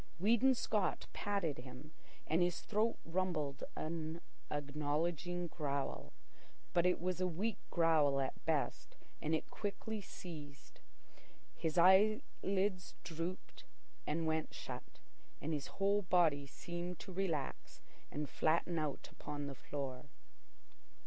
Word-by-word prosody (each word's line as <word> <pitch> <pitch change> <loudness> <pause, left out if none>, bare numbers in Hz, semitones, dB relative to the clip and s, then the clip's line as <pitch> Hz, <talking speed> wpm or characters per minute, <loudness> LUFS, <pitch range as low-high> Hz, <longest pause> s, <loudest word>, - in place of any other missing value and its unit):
Weedon 235 +8 +5
Scott 210 -4 +1
patted 195 -9 0
him, 130 +4 -9 0.3
and 160 +3 +2
his 175 -1 +2
throat 220 +2 +1
rumbled 165 -5 -1
an 160 0 -3 0.3
acknowledging 150 +4 -1
growl. 140 -4 -2 0.6
But 175 0 +5
it 180 - +3
was 180 +1 -1
a 185 - +3
weak 195 +6 -1
growl 155 -5 +4
at 135 -1 -2
best, - - 0 0.2
and 160 +1 +2
it - - -4
quickly 210 +1 -3
ceased. 150 - -9 0.8
His 160 0 -1
eyelids 190 0 +4
drooped 175 +2 -5 0.4
and 160 +2 0
went 160 0 0
shut, - - -7 0.4
and 160 +2 -2
his 145 -2 -2
whole 200 +1 +4
body 170 -7 +3
seemed 175 +4 -5
to 190 - -8
relax 175 -7 -2 0.3
and 150 0 -2
flatten 165 +3 +2
out 150 -2 -2
upon 145 -1 -5
the 140 - -4
floor. 135 0 -5
165 Hz, 120 wpm, -38 LUFS, 150-185 Hz, 0.8 s, Weedon